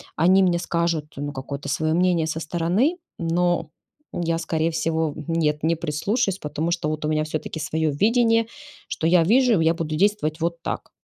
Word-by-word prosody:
они 185 +4 +4
мне 180 -2 +3
скажут 170 -2 -1
ну 145 +1 -4
какое-то 140 +2 -6
свое 155 +3 0
мнение 175 -1 +2
со 160 0 -3
стороны, 175 - 0 0.2
но 175 -1 0 0.4
я, 165 -1 -1
скорее 165 0 -1
всего, 160 -1 -1
нет, 155 -3 0
не 165 +2 +2
прислушаюсь, 190 - -1
потому 155 +3 -3
что 170 -3 -1
вот 155 0 -3
у - - 0
меня 155 0 +1
всё-таки 155 +1 -4
свое 160 0 -1
видение, 230 - +3 0.4
что - - -4
я 170 +1 +5
вижу. 235 +2 +4
Я 165 +1 +3
буду 160 -2 -3
действовать 175 -3 +1
вот 170 0 -2
так. - - -4
165 Hz, 175 wpm, -23 LUFS, 155-180 Hz, 0.4 s, я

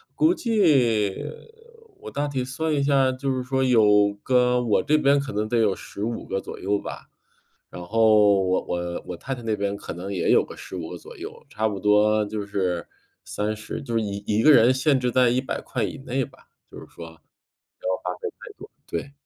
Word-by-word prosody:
估 320 +3 +4
计 145 - +2 0.9
我 435 - -8
大 145 +1 -2
体 135 -3 -2
算 155 +5 -2
一 145 - +1
下， 135 -2 +3
就 135 +2 -3
是 130 -1 -2
说 130 +1 0
有 105 -5 +4
个 125 -1 +3
我 110 -4 +2
这 155 +1 +3
边 140 -1 +3
可 140 0 -4
能 105 +1 -1
得 120 - 0
有 105 -4 +2
15 110 +4 -5
个 95 - -3
左 - - -9
右 100 +2 0
吧， - - -8 0.6
然 90 - -8
后 105 -1 +4
我 95 0 +1
我 85 0 -4
我 90 - -5
太 135 +9 -5
太 120 - -10
那 110 -1 0
边 100 0 -1
可 - - -8
能 95 +4 -6
也 90 -3 -1
有 - - +5
个 - - -11
15 85 -3 -7
个 90 - -6
左 - - -13
右， - - -9
差 110 +1 -1
不 100 -2 -4
多 105 +1 +4
就 105 -1 -4
是 95 -4 -2 0.4
30， 110 +4 -4
就 120 -4 -6
是 115 - +2
1 100 -1 -4
1 105 +1 +1
个 155 - +8
人 120 0 +6
限 135 +2 +2
制 125 -1 0
在 125 0 +4
¥100 130 +2 -2
以 - - -3
内 135 -1 -2
吧， - - -13 0.2
就 - - -10
是 - - -11
说 85 - -10
不 80 - -12
要 - - -18
花 - - -27 1.1
费 - - -1
太 - - -14
多， - - -11 0.2
对。 135 +12 -5
110 Hz, 205 characters per minute, -24 LUFS, 100-130 Hz, 1.1 s, 个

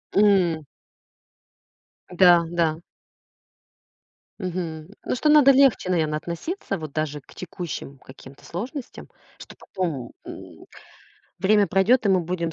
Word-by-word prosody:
М. 185 -6 +3 1.4
Да, 180 -1 +5
да. 165 -2 0 1.6
Мгм. 170 -4 -5 0.2
Ну, - - -1
что 300 +5 +1
надо 295 -2 +7
легче, 270 -8 +3
наверно, 155 -4 0
относиться 195 - -5
вот 155 -3 -8
даже 150 -1 -3
к - - -20
текущим 170 -5 -7
каким-то 135 +1 -15
сложностям, 245 - -7 0.3
что - - -13
потом, 160 -10 -5
м, - - -11 0.7
время 205 +1 +3
пройдет, 205 +5 +3
и - - +2
мы 190 -2 +3
будем 170 -1 -3
180 Hz, 115 wpm, -23 LUFS, 160-200 Hz, 1.6 s, надо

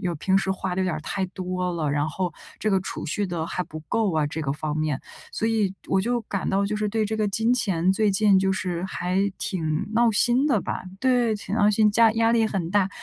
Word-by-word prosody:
有 175 -2 -2
平 190 +5 +1
时 195 0 +1
花 190 -1 -2
得 185 - -1
有 - - 0
点 180 - -1
儿 155 - -5
太 195 +4 -2
多 180 -1 -3
了， 155 -4 -1
然 145 +1 0
后 175 +2 -3 0.3
这 215 - 0
个 190 - +2
储 190 - -5
蓄 200 +6 -1
得 165 -2 -3
还 180 - -2
不 155 -2 -9
够 215 -5 +1
啊， 155 -2 +1
这 160 +2 -4
个 135 - -1
方 150 +1 -3
面。 155 -3 -1 0.3
所 225 - -1
以 215 -4 +1 0.2
我 190 - +2
就 240 +4 0
感 200 -2 -3
到 195 +1 +1
就 210 - -2
是， 210 0 -1
对 220 +1 0
这 220 - -2
个 215 -1 +1
金 225 +4 +2
钱， 190 -6 +1
最 215 0 +2
近 195 0 +4
就 190 0 +1
是 180 -2 -3
还 185 0 -1 0.2
挺 160 -4 -1
闹 235 0 +4
心 240 +6 +3
的 245 -8 +2
吧。 - - -4 0.2
对， 245 -4 +2
挺 205 0 -5
闹 210 -1 +4
心， 210 0 +4
家 225 +1 +5
压 225 0 +2
力 225 -1 +3
很 180 -5 -3
大。 200 -1 +2
190 Hz, 265 characters per minute, -24 LUFS, 175-215 Hz, 0.3 s, 家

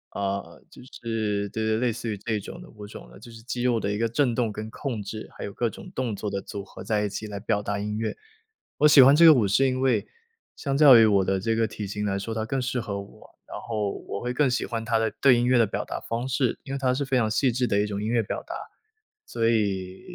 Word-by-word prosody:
呃， 100 0 -4
就 - - -14
是， 110 -5 -3
对 110 +2 -3
对， 110 0 +1
类 120 +1 +1
似 115 +1 -5
于 105 - -3
这 110 +2 -2
种 110 - -9
的 180 - -12
舞 105 -2 -11
种 105 - -11
的 - - -14
就 120 - -13
是 115 0 -13
肌 120 0 -4
肉 120 -2 +2
的 100 -1 -2
一 105 - -2
个 115 0 +1
震 120 +1 +1
动 115 -2 0
跟 105 +1 -6
控 120 -1 -4
制， 110 +2 -7
还 - - -7
有 100 - -7
各 120 +2 -1
种 195 - -11
动 125 - -2
作 105 +1 -4
的 100 0 -3
组 100 0 -7
合 - - -11
在 105 -1 0
一 105 - -1
起 110 +2 -6
来 100 -1 -6
表 105 0 -1
达 100 0 -3
音 105 +1 -3
乐。 110 0 -3 0.6
我 150 - +6
喜 145 -2 +8
欢 135 +3 +7
这 165 - +5
个 160 -1 +10
舞 115 -8 +2
是 135 +8 +3
因 130 0 -1
为 125 -6 +1 0.5
相 140 -2 -3
较 140 -4 +9
于 115 - +7
我 100 -3 +3
的 95 +1 0
这 115 +4 0
个 115 0 +1
体 105 0 -6
型 105 +2 -4
来 100 -1 -1
说， 100 +3 -4
它 110 0 -2
更 135 +5 -2
适 125 -1 -2
合 100 -3 -4
我。 100 - -13 0.2
然 - - -6
后 105 -3 -2 0.2
我 - - -4
会 125 +2 -3
更 135 +1 +2
喜 125 - -1
欢 115 -2 -4
它 115 0 +1
的 110 0 0
对 130 -3 +6
音 120 - +1
乐 125 0 +4
的 115 - +4
表 - - -3
达 - - -5
方 115 +2 -4
式， 130 -1 0
因 135 - -7
为 - - -1
它 130 -1 +1
是 135 +3 -1
非 135 0 -1
常 115 -4 +2
细 125 +4 +2
致 125 +1 0
的 100 - +1
一 105 - +2
种 100 -1 -4
音 105 - -2
乐 115 -1 +2
表 - - -4
达， - - -8 0.7
所 115 -1 0
以， 95 -5 -1
115 Hz, 305 characters per minute, -25 LUFS, 105-125 Hz, 0.7 s, 个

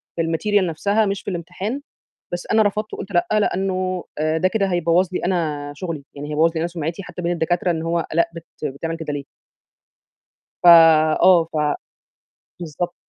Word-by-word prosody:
في 170 - 0
ال 165 0 0
material 205 +1 +2
نفسها 200 +7 +1
مش 200 -1 -2
في - - -6
الامتحان، 190 - -4 0.5
بس 175 - -4
أنا 220 0 +5
رفضت 210 +1 -1
وقُلت 195 - -7
لأ، 175 -1 +2
لأنه 185 -3 0
آآ، 155 +1 +1
ده 185 - +2
كده 200 0 0
هيبوّظ 175 0 +2
لي 180 - -1
أنا 155 -5 -1
شغلي، 160 -3 -5
يعني 145 +1 -7
هيبوظ 155 +2 +3
لي - - -1
أنا 170 - 0
سُمعتي 170 +2 -4
حتى 180 -1 -8
بين 170 0 0
الدكاترة 175 +1 0
إن 160 -2 -1
هو 165 0 -1
آلاء 170 +1 +2
بت 165 -1 -9 0.2
بتعمل 150 +4 -3
كده 160 -2 -5
ليه؟ 145 -1 -4 1.4
فَ - - +2 0.6
آه، 180 -3 +6
ف - - -4 1.0
بالضبط. 175 +2 -4
175 Hz, 180 wpm, -21 LUFS, 160-190 Hz, 1.4 s, آه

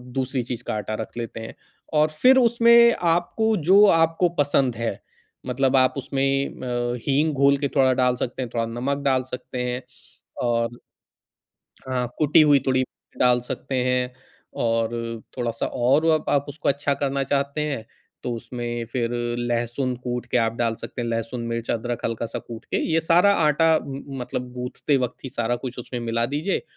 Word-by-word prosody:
दूसरी 130 -1 -1
चीज 120 0 -5
का - - -4
आटा 105 +1 -3
रख 110 - -8
लेते 115 -1 -5
हैं। 115 - -8 0.4
और 155 0 +4
फिर 255 +12 +5
उसमें 235 -1 +6 0.2
आपको 220 +6 0
जो 200 +2 +8
आपको 165 +1 +3
पसंद 135 -4 +2
है, 115 -3 -3 0.5
मतलब 135 +1 +1
आप 130 0 +4
उसमें 135 +1 0
अ, 120 -1 -3
हींग 150 +3 +2
घोल 140 0 +4
के 140 0 -1
थोड़ा 130 -2 +4
डाल 125 0 +3
सकते 125 +1 -4
हैं, 125 - -3
थोड़ा 115 -1 0
नमक 140 +2 -1
डाल 130 -2 +2
सकते 125 0 -4
हैं 125 +1 -3 0.6
और, 120 0 0 1.1
हाँ 125 -1 0
कुटी 155 +1 +5
हुई 145 -2 +5
थोड़ी 130 0 +3 0.4
डाल 125 -1 +4
सकते 135 -1 -4
हैं। 125 0 0 0.5
और 115 0 +1
अ, 115 -1 -4 0.2
थोड़ा-सा 115 -2 -2
और 135 +6 +2 0.2
आप 140 0 +2
उसको 145 +2 -3
अच्छा 140 0 +1
करना 140 0 0
चाहते 140 +2 -1
हैं 110 -5 -4 0.4
तो 125 - -2
उसमें 120 0 -5
फिर 120 -2 -1 0.3
लहसुन 120 +2 -1
कूट 125 0 -3
के - - +2
आप 115 -1 +1
डाल 115 -1 0
सकते 120 - -6
हैं। 120 - -3
लहसुन, 115 +1 -3
मिर्च, 115 0 -3
अदरक 120 +1 -3
हल्का 115 0 -2
सा - - -5
कूट 115 -2 -10
के - - 0 0.2
ये 165 - +3
सारा 175 +5 +4
आटा 160 +2 +3 0.5
मतलब 125 0 -4
गूथते 125 +3 -1
वक़्त 125 +1 -3
ही - - -4
सारा 120 +1 -1
कुछ 125 0 -6
उसमें 125 0 -5
मिला 115 0 -1
दीजिए, 150 +8 -1
125 Hz, 175 wpm, -23 LUFS, 120-140 Hz, 1.1 s, जो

